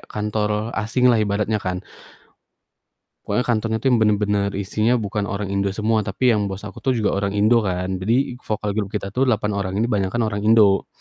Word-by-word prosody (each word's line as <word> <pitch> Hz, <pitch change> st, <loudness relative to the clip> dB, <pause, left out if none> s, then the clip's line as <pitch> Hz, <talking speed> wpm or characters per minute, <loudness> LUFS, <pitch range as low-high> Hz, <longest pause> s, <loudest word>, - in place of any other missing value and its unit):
kantor 105 Hz, +1 st, -2 dB
asing 120 Hz, +3 st, +2 dB
lah 115 Hz, -, +2 dB
ibaratnya 105 Hz, +1 st, 0 dB
kan. 90 Hz, 0 st, -4 dB, 1.4 s
Pokoknya 105 Hz, +5 st, -1 dB
kantornya 110 Hz, -1 st, 0 dB
tuh 130 Hz, +4 st, +1 dB
bener-bener 105 Hz, -2 st, +1 dB
isinya 110 Hz, +5 st, +1 dB
bukan 105 Hz, -2 st, -3 dB
orang 100 Hz, -2 st, -3 dB
Indo 100 Hz, 0 st, 0 dB
semua, 110 Hz, +2 st, 0 dB
tapi 120 Hz, +5 st, +1 dB
yang 105 Hz, -2 st, 0 dB
bos 95 Hz, +2 st, -7 dB
aku 100 Hz, -3 st, -9 dB
tuh 130 Hz, -2 st, 0 dB
juga 105 Hz, -3 st, 0 dB
orang 100 Hz, +1 st, -1 dB
Indo 110 Hz, +3 st, +4 dB
kan. 95 Hz, -2 st, -2 dB
Jadi 125 Hz, +4 st, 0 dB
vokal 105 Hz, -1 st, -3 dB
group 100 Hz, -1 st, -2 dB
kita 100 Hz, 0 st, -5 dB
tuh 130 Hz, +4 st, +1 dB
8 105 Hz, -3 st, +1 dB
orang 100 Hz, -1 st, -3 dB
ini 110 Hz, -, +1 dB
banyakan 110 Hz, 0 st, 0 dB
orang 105 Hz, -, -2 dB
Indo. 105 Hz, -3 st, +5 dB
105 Hz, 185 wpm, -21 LUFS, 100-110 Hz, 1.4 s, Indo